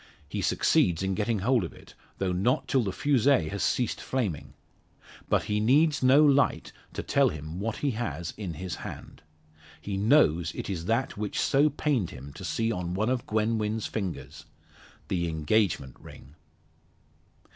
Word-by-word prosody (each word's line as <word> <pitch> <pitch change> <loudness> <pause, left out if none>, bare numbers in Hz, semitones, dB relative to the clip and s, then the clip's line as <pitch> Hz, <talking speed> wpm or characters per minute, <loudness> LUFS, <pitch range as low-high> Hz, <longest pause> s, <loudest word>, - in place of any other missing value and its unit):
He - - -4
succeeds 85 0 +2
in 95 0 0
getting 110 +3 0
hold 125 -4 +3
of 85 - -6
it, - - -16 0.2
though 95 -2 -1
not 95 +8 +1
till 135 - +2
the 100 -4 -2
fusee 130 - +2
has 100 - -4
ceased 120 -3 0
flaming. 110 - -3 0.7
But - - +2
he 105 -1 -1
needs 145 +7 +3
no 135 +4 +6
light 140 -1 +2 0.2
to - - -4
tell - - +3
him 80 +3 -7
what 110 +2 -3
he 140 - +2
has 85 - -4
in 95 -6 -5
his 90 +2 -5
hand. - - -9 0.6
He 100 -1 -4
knows 95 - +3
it - - -4
is 85 -3 -4
that 115 +4 -1
which 105 -1 -3
so 145 +3 +3
pained 140 - 0
him 70 +2 -10
to - - -10
see 115 0 -1
on 90 -3 -3
one 110 +5 0
of 130 -2 -2
Gwen 110 +1 +1
Wynn's 105 +1 -2
fingers 95 -5 -5 0.6
the 85 -2 -1
engagement 80 - 0
ring! 70 - -14
105 Hz, 165 wpm, -28 LUFS, 85-125 Hz, 0.7 s, no